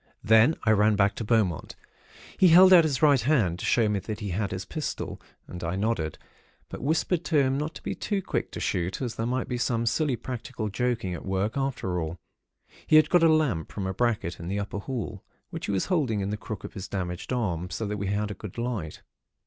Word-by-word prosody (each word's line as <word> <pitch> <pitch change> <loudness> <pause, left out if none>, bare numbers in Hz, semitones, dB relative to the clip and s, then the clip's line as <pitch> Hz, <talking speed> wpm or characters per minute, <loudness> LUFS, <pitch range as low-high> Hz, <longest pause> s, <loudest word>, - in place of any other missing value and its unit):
"Then 110 +8 +5
I 110 - +3
ran 105 0 +4
back 100 0 +3
to - - -3
Beaumont. 105 -8 0 0.6
He 185 - +5
held 185 +3 +8
out 170 -3 +8
his 145 -1 -1
right 145 -4 +5
hand, 110 - +2
to - - -4
show 115 -3 +3
me 105 -1 0
that 105 +2 -6
he 105 -3 -4
had 100 +2 -1
his 95 0 -5
pistol, 155 +6 -5 0.3
and 90 -1 -8
I 85 +2 -2
nodded; 95 -7 -1 0.5
but - - -7
whispered 160 +4 0
to 160 - +1
him 130 0 +1
not 150 +3 -3
to - - -10
be - - -2
too 205 -2 -2
quick - - -2
to - - -5
shoot, 90 +1 -1
as 125 -4 -3
there 115 0 -3
might 125 0 -1
be 125 - -3
some 115 -1 0
silly 140 +3 +1
practical 120 -2 -5
joking 115 -3 -1
at - - -6
work, 95 +3 -1
after 135 -10 -2
all. 80 +2 -4 0.7
He - - +4
had 155 - +6
got 175 - +5
a 165 - +6
lamp 140 - +1
from 100 - -4
a 95 - -2
bracket 110 -5 -1
in 85 - -7
the 100 +2 -2
upper 100 0 -4
hall, 110 -4 -5 0.3
which - - -5
he - - -1
was 95 -2 0
holding 135 - 0
in 100 +1 -2
the - - -1
crook 105 -1 -7
of - - -8
his 95 - -6
damaged 90 0 -4
arm, 90 -8 -1
so 100 +5 -3
that 105 0 -3
we 100 -1 -3
had 105 +1 -1
a - - -3
good 100 +1 -9
light. 115 -10 -4
110 Hz, 235 wpm, -27 LUFS, 95-130 Hz, 0.7 s, held